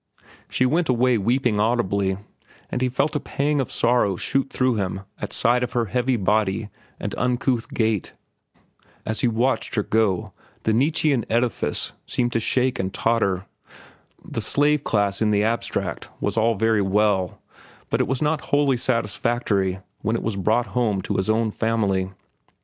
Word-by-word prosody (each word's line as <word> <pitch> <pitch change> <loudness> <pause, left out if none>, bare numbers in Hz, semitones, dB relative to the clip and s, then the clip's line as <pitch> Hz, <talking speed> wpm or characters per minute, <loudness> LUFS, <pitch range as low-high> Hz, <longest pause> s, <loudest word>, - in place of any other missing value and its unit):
She 130 - +1
went 160 +4 +1
away 125 -1 +3
weeping 120 0 +1
audibly, 100 -4 +1 0.5
and 125 - -2
he 130 - +2
felt 140 +5 0
a - - +2
pang 145 +1 0
of 130 - -4
sorrow 120 -5 +2
shoot 135 +8 -1
through 130 -1 +1
him 95 -1 -2 0.2
at - - -5
sight 120 +2 +2
of 125 0 -2
her 120 -2 +1
heavy 125 +3 0
body 105 +1 +1 0.3
and - - -4
uncouth 125 -1 0
gait. 110 -4 -1 0.9
As 110 -1 -2
he - - +3
watched 120 +3 0
her 105 - +1
go, 105 -5 0 0.3
the 110 - +2
Nietzschean 140 0 +2
edifice 120 +1 0
seemed 120 -1 0
to 115 - +2
shake 125 +3 +1
and 95 0 -1
totter. 100 -4 0 0.8
The - - -4
slave 145 0 +2
class 100 -2 0
in 110 - +3
the 105 0 +2
abstract 115 +2 -2
was 100 - -1
all 115 0 +2
very 110 +1 +2
well, 95 -2 +1 0.5
but - - +2
it - - 0
was 130 +3 -1
not 150 0 0
wholly 145 -3 +2
satisfactory 105 -5 0 0.2
when 110 - 0
it - - -2
was 110 -2 -1
brought 110 +5 +1
home 110 -6 +1
to - - -2
his 95 +3 -1
own 110 0 +2
family. 100 -5 0
115 Hz, 165 wpm, -23 LUFS, 105-125 Hz, 0.9 s, away